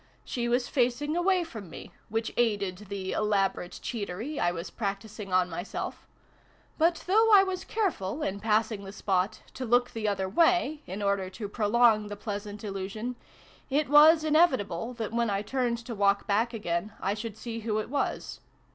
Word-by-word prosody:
She 240 Hz, -1 st, -2 dB
was 245 Hz, +1 st, +1 dB
facing 270 Hz, +4 st, 0 dB
away 360 Hz, +1 st, +2 dB
from 220 Hz, -, -9 dB
me, -, -, -10 dB, 0.2 s
which 225 Hz, +1 st, -2 dB
aided 205 Hz, -4 st, 0 dB
the 195 Hz, -2 st, -4 dB
elaborate 195 Hz, -4 st, 0 dB
cheatery 225 Hz, +5 st, -4 dB
I 175 Hz, -, +2 dB
was 170 Hz, +1 st, -6 dB
practising 205 Hz, -1 st, -5 dB
on 185 Hz, 0 st, +3 dB
myself: 175 Hz, +2 st, -5 dB, 0.7 s
but, 335 Hz, +1 st, +2 dB
though 445 Hz, +4 st, +4 dB
I 400 Hz, -2 st, +9 dB
was 375 Hz, -1 st, -3 dB
careful, 320 Hz, -, -2 dB
in 195 Hz, +1 st, -2 dB
passing 215 Hz, 0 st, +1 dB
the 195 Hz, 0 st, -8 dB
spot, 190 Hz, -1 st, -1 dB
to 260 Hz, -, -5 dB
look 245 Hz, +1 st, +2 dB
the 220 Hz, -2 st, -3 dB
other 195 Hz, -2 st, 0 dB
way, 310 Hz, -, +2 dB
in 195 Hz, +3 st, -5 dB
order 200 Hz, -2 st, 0 dB
to 205 Hz, +2 st, -6 dB
prolong 215 Hz, 0 st, +3 dB
the 205 Hz, -, -5 dB
pleasant 205 Hz, 0 st, -6 dB
illusion, 205 Hz, +4 st, -4 dB, 0.5 s
it 285 Hz, +1 st, +1 dB
was 310 Hz, +2 st, +7 dB
inevitable 260 Hz, -, +2 dB
that, 225 Hz, -2 st, -4 dB
when 235 Hz, -1 st, +1 dB
I 200 Hz, 0 st, -1 dB
turned 245 Hz, +1 st, 0 dB
to 235 Hz, -, -5 dB
walk 200 Hz, -1 st, +2 dB
back 225 Hz, +4 st, +1 dB
again, 205 Hz, -2 st, -3 dB
I 195 Hz, -, 0 dB
should 220 Hz, 0 st, -6 dB
see 230 Hz, -1 st, -5 dB
who 215 Hz, -1 st, -1 dB
it 215 Hz, -, -3 dB
was. 285 Hz, -, -2 dB
220 Hz, 175 wpm, -28 LUFS, 200-255 Hz, 0.7 s, I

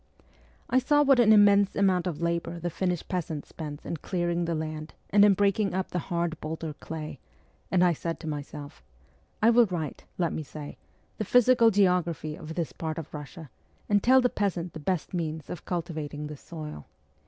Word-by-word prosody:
I 255 Hz, -, +3 dB
saw 290 Hz, +3 st, +3 dB
what 275 Hz, -3 st, +5 dB
an 225 Hz, -3 st, +6 dB
immense 205 Hz, -1 st, +6 dB
amount 190 Hz, -2 st, +2 dB
of 170 Hz, -2 st, -3 dB
labour 170 Hz, 0 st, -1 dB
the 175 Hz, +1 st, -3 dB
Finnish 180 Hz, 0 st, -2 dB
peasant 160 Hz, -5 st, -3 dB
spends 150 Hz, -2 st, -8 dB
in 170 Hz, -, -3 dB
clearing 175 Hz, +1 st, -1 dB
the 170 Hz, 0 st, -1 dB
land 155 Hz, 0 st, -5 dB, 0.2 s
and 205 Hz, 0 st, +6 dB
in 205 Hz, -1 st, +6 dB
breaking 200 Hz, -1 st, +1 dB
up 190 Hz, 0 st, -2 dB
the 180 Hz, -, -1 dB
hard 170 Hz, -2 st, -1 dB
boulder 160 Hz, 0 st, -4 dB
clay, 155 Hz, -2 st, -7 dB, 0.5 s
and 180 Hz, -1 st, +3 dB
I 175 Hz, -1 st, +4 dB
said 165 Hz, +1 st, -4 dB
to 160 Hz, -, -7 dB
myself, 145 Hz, -1 st, -6 dB, 0.3 s
' -, -, -37 dB
I 230 Hz, -, +7 dB
will 235 Hz, -1 st, +6 dB
write, 165 Hz, -6 st, -4 dB
let 170 Hz, -3 st, 0 dB
me -, -, -3 dB
say, 150 Hz, 0 st, -9 dB, 0.4 s
the -, -, 0 dB
physical 245 Hz, +1 st, +5 dB
geography 180 Hz, -6 st, +1 dB
of 160 Hz, +1 st, -8 dB
this 170 Hz, -3 st, -2 dB
part 160 Hz, -1 st, -4 dB
of 160 Hz, -3 st, -6 dB
Kussia, 150 Hz, +1 st, -9 dB, 0.4 s
and 205 Hz, -1 st, +3 dB
tell 260 Hz, +4 st, +6 dB
the 250 Hz, -, +3 dB
peasant 180 Hz, -6 st, -2 dB
the 160 Hz, -, -7 dB
best 175 Hz, +3 st, -2 dB
means 160 Hz, -3 st, -3 dB
of 175 Hz, -, -7 dB
cultivating 160 Hz, -4 st, -4 dB
this 150 Hz, -1 st, -8 dB
soil. 155 Hz, -, -8 dB
170 Hz, 190 wpm, -28 LUFS, 155-195 Hz, 0.5 s, I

